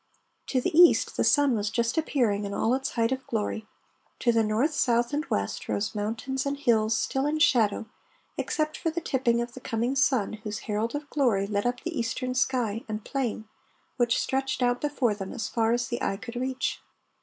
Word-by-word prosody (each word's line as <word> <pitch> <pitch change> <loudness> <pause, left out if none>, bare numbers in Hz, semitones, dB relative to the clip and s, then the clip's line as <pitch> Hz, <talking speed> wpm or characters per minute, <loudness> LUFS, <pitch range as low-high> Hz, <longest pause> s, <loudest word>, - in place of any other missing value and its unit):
To 260 - +1
the 310 +6 -2
east 350 +1 +6
the - - +1
sun 285 -4 +4
was 205 -1 -1
just 230 +1 0
appearing 245 -10 +1
in 200 0 -4
all 225 - +1
its 265 +1 -1
height 230 0 +1
of 265 0 -3
glory. 220 -1 -2 0.5
To 240 - +4
the 230 -1 +3
north, 225 +9 +1
south, 240 -1 +1
and 295 +1 0
west, 100 0 -2
rose 200 - -1
mountains 230 +5 -2
and 280 0 -2
hills 225 -5 +2
still 270 +4 0
in 305 +1 0
shadow, 225 -8 +3 0.5
except 310 0 -1
for 330 - -1
the 325 +2 -2
tipping 245 -6 +1
of 240 0 -5
the - - -9
coming 240 +2 -1
sun 260 -7 +2
whose 210 -1 -4
herald 220 +4 -1
of 290 0 -4
glory 235 -9 +2
lit 205 +2 -1
up 245 0 -2
the 340 -1 -4
eastern 255 +1 -2
sky 245 -4 0
and 215 0 -4
plain 240 -5 -2 0.5
which 240 -2 +2
stretched 265 -1 -1
out 245 0 +1
before 275 -6 +1
them 195 -2 -6
as 225 -4 -3
far 225 -1 +1
as 240 0 0
the 240 +2 -3
eye 195 - -1
could 235 +2 -9
reach. 260 +1 -2
240 Hz, 200 wpm, -27 LUFS, 220-270 Hz, 0.5 s, east